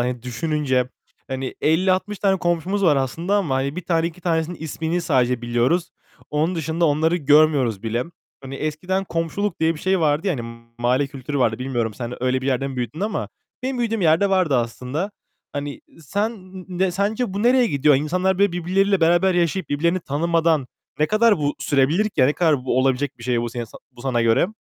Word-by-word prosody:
Hani, 120 Hz, -1 st, -2 dB
düşününce, 130 Hz, -1 st, -1 dB, 0.4 s
hani, 130 Hz, 0 st, -4 dB
50-60 185 Hz, +5 st, +1 dB
tane 195 Hz, -1 st, +2 dB
komşumuz 175 Hz, +4 st, 0 dB
var 150 Hz, -5 st, +5 dB
aslında 165 Hz, +9 st, -1 dB
ama, 160 Hz, -10 st, 0 dB
hani, 140 Hz, +3 st, -1 dB
1 180 Hz, -, -4 dB
tane, 165 Hz, -1 st, +1 dB
2 170 Hz, +1 st, -7 dB
tanesinin 165 Hz, 0 st, -1 dB
ismini 160 Hz, +2 st, -2 dB
sadece 125 Hz, -6 st, +1 dB
biliyoruz. 120 Hz, +10 st, +1 dB, 0.4 s
Onun 155 Hz, +5 st, 0 dB
dışında 165 Hz, +1 st, -1 dB
onları 160 Hz, +4 st, +2 dB
görmüyoruz 145 Hz, -, +3 dB
bile. 115 Hz, +2 st, -1 dB, 0.4 s
Hani 135 Hz, 0 st, -8 dB
eskiden 165 Hz, +7 st, -2 dB
komşuluk 170 Hz, +3 st, -2 dB
diye 160 Hz, +1 st, +2 dB
bir 155 Hz, -, -10 dB
şey 190 Hz, -1 st, +1 dB
vardı, 155 Hz, +3 st, +1 dB
yani 155 Hz, -11 st, 0 dB, 0.4 s
mahalle 125 Hz, +4 st, +2 dB
kültürü 140 Hz, +1 st, -5 dB
vardı. 115 Hz, -4 st, +1 dB
Bilmiyorum 120 Hz, -4 st, -2 dB
sen 120 Hz, +3 st, -6 dB
öyle 130 Hz, 0 st, +1 dB
bir -, -, -3 dB
yerde 135 Hz, 0 st, 0 dB
mi 135 Hz, -, -7 dB
büyüdün 125 Hz, +7 st, -4 dB
ama 210 Hz, +1 st, -2 dB, 0.3 s
benim 260 Hz, 0 st, -2 dB
büyüdüğüm 225 Hz, -3 st, -1 dB
yerde 170 Hz, +4 st, +3 dB
vardı 185 Hz, -8 st, +3 dB
aslında. 125 Hz, -, -2 dB, 0.4 s
Hani, 145 Hz, 0 st, -5 dB, 0.2 s
sen 205 Hz, +9 st, -2 dB, 0.3 s
ne 185 Hz, +1 st, 0 dB
sence 200 Hz, +3 st, -1 dB
bu 205 Hz, -, -2 dB
nereye 245 Hz, +1 st, +4 dB
gidiyor? 145 Hz, -3 st, +3 dB
İnsanlar 180 Hz, +7 st, 0 dB
böyle 200 Hz, -3 st, +3 dB
birbirleriyle 190 Hz, +3 st, +1 dB
beraber 175 Hz, +3 st, +4 dB
yaşayıp 175 Hz, +2 st, 0 dB
birbirlerini 170 Hz, +5 st, +1 dB
tanımadan 160 Hz, -1 st, +1 dB, 0.3 s
ne 155 Hz, -, +3 dB
kadar 215 Hz, 0 st, +3 dB
bu 145 Hz, -1 st, 0 dB
sürebilir 145 Hz, +8 st, +2 dB
ki? 180 Hz, -, -2 dB
Ya, 130 Hz, -, +6 dB
ne 145 Hz, -, +2 dB
kadar 150 Hz, -6 st, +1 dB
bu 130 Hz, -1 st, +1 dB
olabilecek 130 Hz, 0 st, 0 dB
bir -, -, -12 dB
şey 120 Hz, -1 st, +1 dB
bu 120 Hz, -, -2 dB
senin 120 Hz, 0 st, -4 dB
sa 110 Hz, -, -14 dB
bu 120 Hz, -, -14 dB
sana 125 Hz, -3 st, 0 dB
göre? 115 Hz, +7 st, +3 dB
155 Hz, 190 wpm, -22 LUFS, 130-180 Hz, 0.4 s, Ya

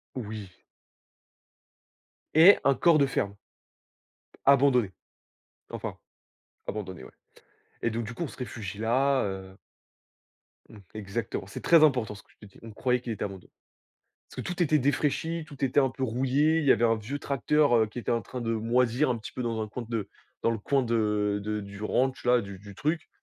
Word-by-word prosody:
Oui. 105 Hz, -5 st, -6 dB, 1.8 s
Et 170 Hz, +6 st, +8 dB
un 140 Hz, -, +4 dB
corps 165 Hz, +3 st, +4 dB
de 140 Hz, -, +4 dB
ferme. 100 Hz, -7 st, -2 dB, 1.1 s
Abandonné. 135 Hz, -6 st, +4 dB, 0.8 s
Enfin, -, -, -5 dB, 0.7 s
abandonné 95 Hz, -8 st, -5 dB
ouais -, -, -12 dB, 0.7 s
et 115 Hz, -, 0 dB
donc 115 Hz, +1 st, -3 dB
du 115 Hz, -, -6 dB
coup 170 Hz, -, -3 dB
on -, -, -3 dB
se -, -, -12 dB
réfugie 105 Hz, -5 st, -6 dB
là, 130 Hz, +4 st, +2 dB
heu 95 Hz, -1 st, -6 dB, 1.1 s
Mmh. 110 Hz, -, -13 dB, 0.2 s
Exactement, 105 Hz, -1 st, -4 dB
c'est 100 Hz, -, -8 dB
très 165 Hz, -2 st, +6 dB
important 125 Hz, -8 st, +3 dB
ce 100 Hz, -, -13 dB
que -, -, -32 dB
je 105 Hz, -, -16 dB
te 100 Hz, -, -18 dB
dis, -, -, -19 dB
on 115 Hz, -, -9 dB
croyait 125 Hz, +3 st, 0 dB
qu'il 120 Hz, -2 st, -4 dB
était 105 Hz, -, -4 dB
abandonné. 95 Hz, -3 st, -8 dB, 0.8 s
Parce -, -, -16 dB
que -, -, -6 dB
tout 180 Hz, 0 st, -1 dB
était 155 Hz, -1 st, +3 dB
défraichi, 150 Hz, +4 st, 0 dB
tout 140 Hz, -3 st, -12 dB
était 135 Hz, +2 st, +3 dB
un 135 Hz, -2 st, +2 dB
peu 130 Hz, -, -7 dB
rouillé, 135 Hz, +6 st, +2 dB
il 160 Hz, -, -1 dB
y 135 Hz, -, +6 dB
avait 120 Hz, -, +2 dB
un 115 Hz, -1 st, +3 dB
vieux 120 Hz, +7 st, -5 dB
tracteur, 140 Hz, 0 st, +2 dB
heu, 110 Hz, -, +4 dB
qui 105 Hz, +3 st, -9 dB
était -, -, -3 dB
en 115 Hz, -, 0 dB
train 125 Hz, +3 st, -7 dB
de 115 Hz, -1 st, -1 dB
moisir 120 Hz, +4 st, +1 dB
un 120 Hz, -, 0 dB
petit 110 Hz, -, -9 dB
peu 125 Hz, -, -4 dB
dans 115 Hz, -2 st, -2 dB
un 110 Hz, -, -3 dB
coin 120 Hz, +3 st, -6 dB
de 115 Hz, -4 st, -3 dB, 0.3 s
dans -, -, +3 dB
le 115 Hz, -, -2 dB
coin 135 Hz, +6 st, +1 dB
de 105 Hz, -3 st, 0 dB
de 105 Hz, 0 st, -2 dB
du 100 Hz, +1 st, -9 dB
ranch-là, 125 Hz, +1 st, +2 dB
du 100 Hz, -1 st, -8 dB
du 100 Hz, 0 st, -12 dB
truc. 155 Hz, -, -2 dB
120 Hz, 190 wpm, -28 LUFS, 105-135 Hz, 1.8 s, Et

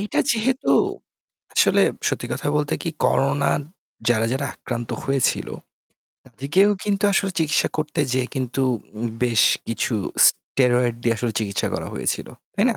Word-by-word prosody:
এইটা 205 Hz, -, -2 dB
যেহেতু, 250 Hz, +3 st, 0 dB, 0.8 s
আসলে -, -, +4 dB, 0.3 s
সত্যি -, -, -3 dB
কথা -, -, -4 dB
বলতে 145 Hz, -1 st, 0 dB
কি 165 Hz, -, -2 dB
করোনা 140 Hz, +2 st, +2 dB, 0.6 s
যারা, 115 Hz, -2 st, +2 dB
যারা 140 Hz, +1 st, -1 dB
আক্রান্ত 120 Hz, -2 st, -5 dB
হয়েছিল, 135 Hz, -2 st, +1 dB, 0.8 s
তাদেরকেও 190 Hz, +10 st, +2 dB
কিন্তু 200 Hz, -1 st, 0 dB
আসলে 195 Hz, 0 st, +1 dB
চিকিৎসা 155 Hz, -1 st, +2 dB
করতে 155 Hz, -1 st, -1 dB
যেয়ে 130 Hz, -1 st, +1 dB
কিন্তু 130 Hz, 0 st, -2 dB, 0.4 s
উম 120 Hz, -, -2 dB, 0.2 s
বেশ 120 Hz, -3 st, +3 dB, 0.3 s
কিছু 115 Hz, +1 st, -1 dB, 0.3 s
স্টেরয়েড 125 Hz, -2 st, +1 dB
দিয়ে 115 Hz, -1 st, +2 dB
আসলে 115 Hz, 0 st, -2 dB
চিকিৎসা 100 Hz, -2 st, -1 dB
করা -, -, -3 dB
হয়েছিল। -, -, -2 dB, 0.3 s
তাই 205 Hz, -, +2 dB
না? -, -, -3 dB
135 Hz, 140 wpm, -22 LUFS, 120-165 Hz, 0.8 s, আসলে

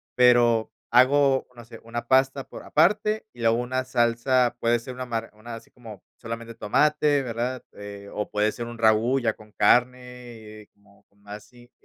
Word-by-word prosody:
pero 120 Hz, -3 st, +4 dB, 0.2 s
hago, 135 Hz, +2 st, +4 dB
no 120 Hz, -, -12 dB
sé, 115 Hz, -1 st, -13 dB
una 120 Hz, +1 st, -6 dB
pasta 135 Hz, +1 st, +2 dB
por -, -, -10 dB
aparte 210 Hz, +6 st, +1 dB
y -, -, -19 dB
luego 115 Hz, 0 st, +2 dB
una 130 Hz, +2 st, -2 dB
salsa, 120 Hz, 0 st, +1 dB
puede 120 Hz, +1 st, +2 dB
ser 125 Hz, +2 st, -9 dB
una 130 Hz, 0 st, -6 dB
mar 115 Hz, -2 st, -4 dB
una 110 Hz, +2 st, -10 dB
así 115 Hz, -, -13 dB
como 110 Hz, -5 st, -13 dB, 0.2 s
solamente 115 Hz, 0 st, -7 dB
tomate, 145 Hz, +6 st, +1 dB
¿verdad?, 120 Hz, +1 st, -4 dB
eh, 100 Hz, 0 st, -10 dB
o 105 Hz, -, -4 dB
puede 105 Hz, +1 st, 0 dB
ser 120 Hz, -, -6 dB
un 120 Hz, 0 st, -9 dB
ragú 115 Hz, +4 st, +2 dB
ya 115 Hz, -3 st, 0 dB
con 105 Hz, -1 st, -18 dB
carne, 125 Hz, +1 st, +3 dB, 0.6 s
eh, 105 Hz, -, -19 dB
como 100 Hz, 0 st, -26 dB
con 100 Hz, 0 st, -33 dB
más 105 Hz, 0 st, -9 dB
así, 120 Hz, -1 st, -20 dB
120 Hz, 180 wpm, -24 LUFS, 115-130 Hz, 0.6 s, pero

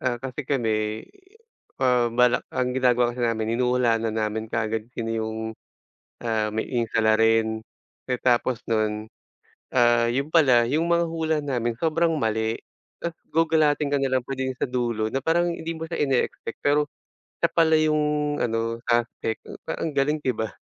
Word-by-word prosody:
ah, 125 Hz, -2 st, 0 dB
kasi 130 Hz, +3 st, -6 dB
kami, 110 Hz, -5 st, 0 dB, 0.7 s
ah, 125 Hz, -3 st, +3 dB
balak 125 Hz, +1 st, +3 dB
ang 125 Hz, -1 st, -1 dB
ginagawa 125 Hz, -2 st, +2 dB
kasi 125 Hz, -, -7 dB
namin 115 Hz, -1 st, 0 dB
hinuhulaan 125 Hz, -2 st, +2 dB
na 110 Hz, -, -3 dB
namin 110 Hz, 0 st, -2 dB
kaagad 110 Hz, 0 st, -2 dB
kung -, -, -39 dB
sino 115 Hz, -1 st, -3 dB
yung, 110 Hz, 0 st, -3 dB, 0.8 s
ah, 110 Hz, -2 st, -1 dB
may 110 Hz, +1 st, -2 dB
yung 120 Hz, -2 st, 0 dB
salarin. 110 Hz, 0 st, +3 dB, 0.5 s
Eh, 125 Hz, -, -1 dB
tapos 125 Hz, -1 st, +2 dB
nun, 110 Hz, -1 st, 0 dB, 0.7 s
ah, 120 Hz, -1 st, +4 dB
yun 140 Hz, +4 st, -1 dB
pala, 130 Hz, -8 st, +4 dB
yung 155 Hz, +5 st, +1 dB
mga 170 Hz, 0 st, +2 dB
hula 160 Hz, -1 st, 0 dB
namin 120 Hz, -5 st, -1 dB
sobrang 165 Hz, +1 st, +2 dB
mali. 110 Hz, -5 st, -1 dB, 0.4 s
Tapos 170 Hz, -1 st, -4 dB, 0.2 s
gugalatin 155 Hz, -2 st, +2 dB
ka 145 Hz, -, +2 dB
nalang 130 Hz, -2 st, +1 dB
pagdating 130 Hz, -1 st, -3 dB
sa -, -, 0 dB
dulo, 120 Hz, -3 st, -1 dB
na 135 Hz, -, -2 dB
parang 170 Hz, +4 st, +2 dB
hindi 165 Hz, -1 st, -4 dB
mo 160 Hz, 0 st, -7 dB
siya 170 Hz, -, -2 dB
ineexpect, 135 Hz, -3 st, -2 dB
pero 145 Hz, +1 st, +3 dB, 0.6 s
siya -, -, +3 dB
pala 160 Hz, -1 st, +3 dB
yung 150 Hz, -1 st, +1 dB
ano, 115 Hz, 0 st, -1 dB
suspect, 120 Hz, -1 st, -1 dB, 0.2 s
parang -, -, -3 dB
ang -, -, -6 dB
galing, 150 Hz, +2 st, +1 dB
'di 130 Hz, -5 st, -1 dB
ba? 110 Hz, -1 st, -3 dB
125 Hz, 165 wpm, -25 LUFS, 115-150 Hz, 0.8 s, ah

